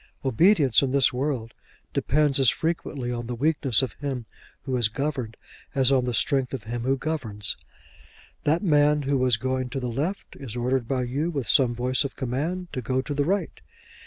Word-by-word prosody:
Obedience 140 - +4
in 135 - 0
this 135 -1 +3
world 125 -4 -2 0.4
depends 145 0 +2
as 130 -4 +6
frequently 150 -6 -2
on 120 -1 -4
the 120 - -3
weakness 135 -2 +2
of 130 - -3
him 135 -5 -3 0.4
who 130 -2 -2
is 120 -4 +3
governed 130 -3 -3 0.4
as 135 -1 +4
on 130 -2 +3
the 125 - -1
strength 135 +2 +1
of 120 - -7
him 120 +2 -4
who 135 +1 +2
governs. 125 -10 -3 0.9
That 160 +6 +1
man 150 -3 +3
who 140 0 +1
was 125 -3 +3
going 130 +1 -2
to 135 - -3
the 125 -2 -3
left 155 +11 -3
is 125 -5 -7
ordered 125 0 0
by 130 -1 0
you 140 +7 -1
with 140 -8 -3
some 120 -1 +4
voice 125 +3 +1
of 140 - -5
command 155 +8 -3
to 130 - -3
go 130 +2 -1
to 145 - -4
the 145 0 0
right. 195 +5 -1
130 Hz, 190 wpm, -25 LUFS, 125-145 Hz, 0.9 s, as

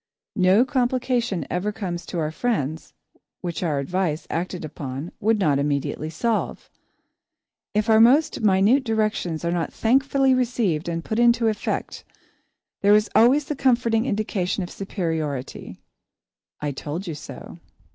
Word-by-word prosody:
No 190 +5 +4
complication 245 - 0
ever 180 +5 -1
comes 180 -5 -5
to - - -5
our 155 -2 -1
friends, 160 - -2 0.5
which 175 -2 -4
our 160 -5 0
advice, 160 +2 -1
acted 175 0 -3
upon, 145 +1 -6
would 220 +2 +2
not 150 -8 +2
immediately 145 +1 -2
solve. 220 +8 -2 1.0
If 210 +1 +1
our 220 -1 +5
most 265 +4 +4
minute 210 +6 +4
directions 215 -8 -1
are 170 - 0
not 170 -1 -1
thankfully 270 +3 +2
received 230 -11 0
and 165 -1 -4
put 220 - -2
into 235 -1 +4
effect, 215 -1 -3 0.8
there 205 +1 +6
is 210 0 +2
always 265 +6 +5
the 295 - -3
comforting 240 -3 +2
indication 200 -4 -1
of 175 - -7
superiority 160 - -4 0.8
"I 150 -1 -2
told 150 +7 -5
you 170 - -4
so." 150 - -10
195 Hz, 135 wpm, -23 LUFS, 165-235 Hz, 1.0 s, there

